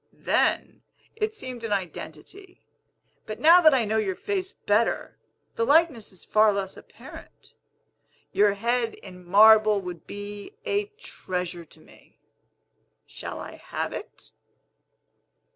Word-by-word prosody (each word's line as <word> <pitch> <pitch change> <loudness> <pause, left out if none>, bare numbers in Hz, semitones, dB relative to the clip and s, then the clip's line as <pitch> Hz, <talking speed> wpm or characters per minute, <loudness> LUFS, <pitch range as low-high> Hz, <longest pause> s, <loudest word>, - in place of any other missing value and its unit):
Then, - - +1 0.3
it 435 0 -2
seemed 255 - -7
an 225 - -4
identity; 195 - -6 0.6
but 215 - -6
now 335 +3 +7
that 310 -4 +6
I 240 -4 +1
know 215 +1 0
your 195 -3 -1
face 380 - -3
better, 210 +3 -1 0.4
the 230 - 0
likeness 285 -5 +2
is 185 - -14
far 215 0 +4
less 195 -1 -3
apparent. - - -14 0.8
Your 205 0 +3
head 235 +2 -1
in 180 -2 -13
marble 215 +3 +6
would 180 -3 -8
be 205 - -8
a 410 +1 0
treasure 180 - -5
to - - -20
me. - - -21 0.9
Shall - - -8
I - - -9
have - - -5
it?" - - -10
215 Hz, 125 wpm, -25 LUFS, 195-285 Hz, 0.9 s, now